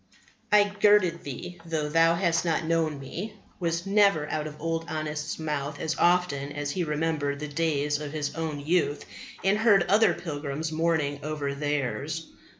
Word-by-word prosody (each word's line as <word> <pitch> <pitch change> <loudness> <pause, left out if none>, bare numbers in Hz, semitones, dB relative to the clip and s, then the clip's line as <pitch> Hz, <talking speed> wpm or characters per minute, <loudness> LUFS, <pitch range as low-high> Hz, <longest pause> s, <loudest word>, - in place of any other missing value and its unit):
"I 210 -1 +7
girded 205 -4 +3
thee 160 +6 -7
though 160 -3 -2
thou 165 +2 +4
hast 170 -2 +1
not 165 -1 0
known 160 -2 +1
Me" 185 +10 -6 0.2
was 170 -1 -1
never 195 -6 +3
out 155 0 -2
of 150 0 -10
Old 165 +1 -2
Honest's 155 -1 -3
mouth 150 -2 -3
as 160 - -1
often 175 -6 +2
as 145 0 -3
he 180 +3 -1
remembered 150 -2 -1
the 150 - -4
days 150 -1 0
of 150 -1 -5
his 150 -2 -3
own 160 -3 -3
youth 155 -1 0 0.4
and 195 +3 +3
heard 210 -5 +5
other 210 +5 +4
pilgrims 150 -1 -4
mourning 155 -3 0
over 150 -2 -3
theirs. 145 +2 -2
160 Hz, 160 wpm, -27 LUFS, 145-170 Hz, 0.4 s, I